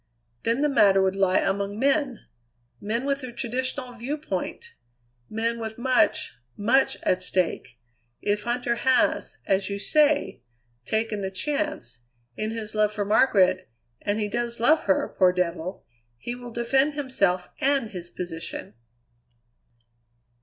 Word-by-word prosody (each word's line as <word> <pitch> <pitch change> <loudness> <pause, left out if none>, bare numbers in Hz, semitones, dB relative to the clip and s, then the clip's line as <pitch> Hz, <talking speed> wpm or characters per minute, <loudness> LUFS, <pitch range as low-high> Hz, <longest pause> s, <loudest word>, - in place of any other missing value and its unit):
Then 230 +4 0
the 295 - +4
matter 200 -9 +5
would 190 0 +2
lie 190 -1 +3
among 200 +1 0
men; 275 0 +1 0.5
men 230 +5 -2
with 280 0 0
the 255 -2 -6
traditional 255 +2 -3
viewpoint; 295 - -4 0.6
men 230 +2 -1
with 220 -1 -5
much, 255 +1 +2 0.2
much 240 +6 +3
at 185 0 +1
stake. 180 -9 -1 0.4
If 205 0 -1
Huntter 240 0 -1
has, 260 +1 +2
as 195 0 +1
you 200 - -2
say, 300 - +2 0.4
taken 220 -1 -1
the 190 - -2
chance, 195 - -3 0.4
in 215 - -2
his 220 -1 -5
love 215 -1 +2
for 210 -1 -2
Margaret 190 -4 +3 0.3
and 205 +1 -1
he 210 - 0
does 235 +2 -2
love 305 +7 +4
her, 190 - +1
poor 185 -2 +6
devil! 180 0 -3 0.3
he 240 - -5
will 245 0 -8
defend 265 +5 +1
himself 200 -11 0
and 275 -5 +1
his 175 -2 -6
position." 175 -7 -6
225 Hz, 135 wpm, -25 LUFS, 195-260 Hz, 0.6 s, poor